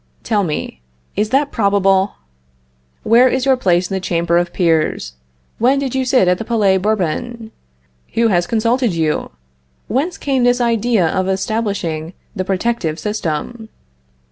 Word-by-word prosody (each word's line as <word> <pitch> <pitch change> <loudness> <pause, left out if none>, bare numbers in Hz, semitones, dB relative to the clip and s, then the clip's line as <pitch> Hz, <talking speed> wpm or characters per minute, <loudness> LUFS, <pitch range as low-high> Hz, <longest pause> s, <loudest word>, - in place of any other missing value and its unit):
Tell 210 -3 +1
me, 150 - -4 0.3
is 210 +2 0
that 280 +4 +1
probable? 200 -2 +2 0.9
Where 240 +3 +5
is 260 +1 -1
your 270 -1 +4
place 180 -7 +1
in 195 - -6
the 190 - 0
Chamber 170 -1 +1
of 175 0 -2
Peers? 160 - 0 0.5
When 255 +5 +3
did 275 -2 -2
you 265 0 0
sit 250 -7 +3
at 180 0 +2
the - - -3
Palais 210 -4 +2
Bourbon? 220 +4 -2 0.6
Who 230 0 +3
has 175 -3 +1
consulted 230 +1 +1
you? 160 -2 -1 0.6
Whence 295 +9 -1
came 270 -3 0
this 245 0 +3
idea 230 -4 +2
of 185 +3 -1
establishing 190 -5 -2 0.2
the 185 - -1
protective 190 -4 -1
system? 210 +3 -4
210 Hz, 145 wpm, -17 LUFS, 175-240 Hz, 0.9 s, Where